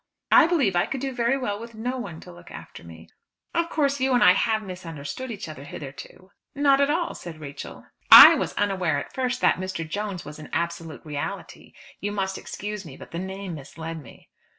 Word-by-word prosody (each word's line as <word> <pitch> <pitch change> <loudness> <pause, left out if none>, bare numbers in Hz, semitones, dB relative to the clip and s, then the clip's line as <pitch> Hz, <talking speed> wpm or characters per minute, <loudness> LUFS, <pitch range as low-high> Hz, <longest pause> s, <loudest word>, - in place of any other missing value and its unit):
"I 340 -2 +7
believe 275 - +1
I 175 - +2
could 275 - -4
do 270 0 -3
very 245 +2 +1
well 205 -6 -3
with 230 0 -10
no 250 +4 -3
one 170 -9 -7
to - - -12
look 85 0 -14
after - - -11
me." 80 -1 -13 0.5
"Of 335 -1 0
course 280 -3 0
you 265 0 +1
and 245 - +4
I 180 - +8
have 220 +2 0
misunderstood 180 - -7
each 215 -5 -6
other 155 -3 -9
hitherto." 145 +6 -10 0.2
"Not 280 -1 +4
at 280 - +3
all," 335 +3 0
said 165 -3 -9
Rachel. 140 -2 -9 0.3
"I - - +13
was - - -2
unaware 185 -7 0
at 140 - -6
first 255 -1 -2
that - - +4
Mr. 185 -3 -4
Jones 200 +1 -4
was 150 +1 -9
an 155 - -10
absolute 170 -2 -4
reality. 150 -2 -6 0.3
You 205 +1 -3
must 190 -1 -2
excuse 210 0 -6
me, 150 -6 -11
but - - -12
the 170 - -4
name 190 0 -6
misled 160 +2 -7
me." 120 - -16
190 Hz, 205 wpm, -25 LUFS, 160-250 Hz, 0.5 s, I